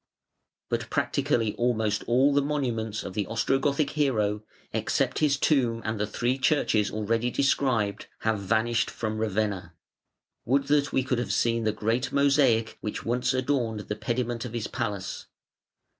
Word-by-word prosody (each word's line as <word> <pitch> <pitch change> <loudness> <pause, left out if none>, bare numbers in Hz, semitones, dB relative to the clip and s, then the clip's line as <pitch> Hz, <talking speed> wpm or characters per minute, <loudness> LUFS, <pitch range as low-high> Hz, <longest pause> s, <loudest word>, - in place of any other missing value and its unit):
But - - -2
practically 110 -3 0
almost 110 -3 +1
all 130 +4 +4
the 140 - +4
monuments 120 -7 -2
of - - -6
the 100 -1 -2
Ostrogothic 140 +5 +1
hero 110 -9 +1 0.3
except - - 0
his 145 -2 +3
tomb 125 -6 +2
and 110 -1 -2
the 105 - 0
three 120 +5 -1
churches 125 -7 +2
already 115 +3 0
described, 125 -6 +1
have 110 -2 +1
vanished 115 +4 +1
from 110 -1 -3
Ravenna. 100 -5 -1 0.7
Would 135 +3 +1
that 145 0 +3
we 130 - +1
could 125 -1 0
have 115 -5 -2
seen 115 +3 +1
the 110 - +3
great 115 +5 -1
mosaic 135 -5 +3
which 105 - -4
once 125 +2 +1
adorned 130 -5 0
the 105 - -4
pediment 120 +1 -2
of 125 -2 -6
his 115 -3 -2
palace. 100 -2 -4
115 Hz, 150 wpm, -27 LUFS, 110-135 Hz, 0.7 s, all